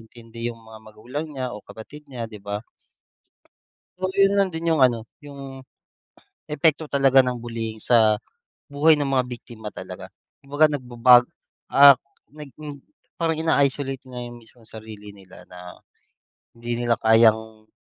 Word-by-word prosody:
intindi 115 +1 -8
yung 115 - -12
mga 110 0 -13
magulang 120 +8 -7
niya 130 -4 -5
o 105 - -10
kapatid 150 +7 -12
niya, 120 -3 -5
'di 105 -2 -11
ba? 105 +1 -4 1.4
So 185 - -1
yun 195 0 +4
lang 195 - +2
din 165 +1 -1
yung 155 -4 +1
ano, 120 -3 +2 0.2
yung, 135 -2 -10 0.8
epekto 150 +1 +1
talaga 135 -2 +4
ng 125 -1 +2
bullying 115 -2 -5
sa 110 -1 +3 0.5
buhay 150 +2 +3
ng 145 - -1
mga 135 -2 +1
biktima 110 -2 -9
talaga. - - -10 0.3
Kumbaga 145 +3 +3
nagbabago, 125 -3 +4 0.4
ah, 140 0 +9 0.3
nagin 145 -1 -11 0.3
parang 165 -1 -1
ina-isolate 140 -4 0
niya 125 -1 -7
yung 120 - -11
mismong 115 0 -20
sarili 110 -2 -11
nila 95 -2 -16
na 90 0 -12 0.8
hindi 120 0 -4
nila 115 -1 +2
kayang, 110 -1 +3
125 Hz, 140 wpm, -23 LUFS, 110-145 Hz, 1.4 s, ah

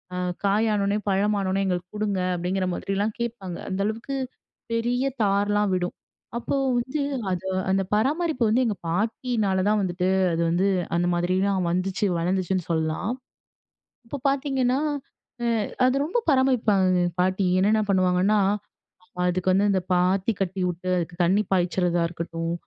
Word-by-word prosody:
அ - - -3 0.3
காய் 210 +3 +3
ஆனோனே, 200 0 +1
பழம் 205 +2 +2
ஆனோனே 190 0 0
எங்களுக்கு 180 -1 -2
கொடுங்க. 210 -2 -1 0.2
அப்படிங்கிற 185 +2 -1
மாதிரிலாம் 200 +4 -1
கேட்பாங்க. 230 -7 -4
அந்த 190 0 -3
அளவுக்கு 230 +5 -3 0.6
பெரிய 245 +3 0 0.2
தார்லாம் 205 0 +2
விடும். 180 -1 -2 0.4
அப்போ 240 - -2 0.2
வந்து 260 +5 -2 0.3
அது 185 +1 -3 0.2
அந்த 195 0 +2
பராமரிப்பு 295 +3 +1
வந்து 245 +4 +3
எங்க 215 - 0
பாட்டினால 210 0 0
தான் 215 0 +3
வந்துட்டு, 180 0 -1 0.2
அது 165 - 0
வந்து 180 +4 +2 0.3
அந்த 175 +1 +1
மாதிரிலாம் 185 +1 +1
வந்துச்சு, 185 +3 0
வளர்ந்துச்சுன்னு 185 0 -1
சொல்லலாம். 160 +5 -1 1.0
இப்ப 280 +2 -6
பார்த்தீங்கன்னா, 270 -2 +1 0.7
அ - - +1 0.4
அது 255 +1 +2
ரொம்ப 410 +9 -1
பராமரிப்பாங்கங்க 220 -9 +3
எங்க 175 - -2
பாட்டி. 185 +1 +1
என்னன்ன 215 +3 +3
பண்ணுவாங்கன்னா, 185 +2 +3 0.8
அ - - -7
அதுக்கு 185 +1 +1
வந்து 200 +2 +3
இந்த 190 - +1
பாத்தி 185 +4 +2
கட்டி 190 0 -1
விட்டு, 180 +1 -6
அதுக்கு 170 0 -4
தண்ணி 195 +5 +3
பாய்ச்சிறதா 175 -1 +1
இருக்கட்டும், 165 0 -4
195 Hz, 140 wpm, -25 LUFS, 180-220 Hz, 1.0 s, காய்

